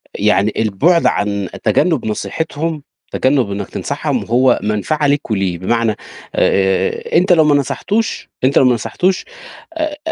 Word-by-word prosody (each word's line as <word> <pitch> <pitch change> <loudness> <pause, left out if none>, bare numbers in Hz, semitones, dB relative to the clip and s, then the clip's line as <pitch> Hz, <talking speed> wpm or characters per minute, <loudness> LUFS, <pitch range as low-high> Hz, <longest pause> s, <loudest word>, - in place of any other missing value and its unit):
يعني 105 0 +2
البُعد 130 - +2
عن 100 -2 0
تجنّب 160 -10 +1
نصيحتهم، 155 +7 -3 0.3
تجنّب 130 -6 +1
إنك 100 +1 -4
تنصحهم - - -3
هو 125 +3 +3
منفعة 125 +9 0
لك 140 -4 0
وليه. 95 -4 0
بمعنى، 115 +2 0 0.4
آآ، 95 0 +1
أنت 180 +1 +4
لو 160 -2 +5
ما 150 -1 +3
نصحتوش 205 - -1
أنت 135 +2 +3
لو - - +5
ما 125 - +4
نصحتوش 180 - -1 0.5
آآ، 310 -2 -3
130 Hz, 135 wpm, -16 LUFS, 105-160 Hz, 0.5 s, لو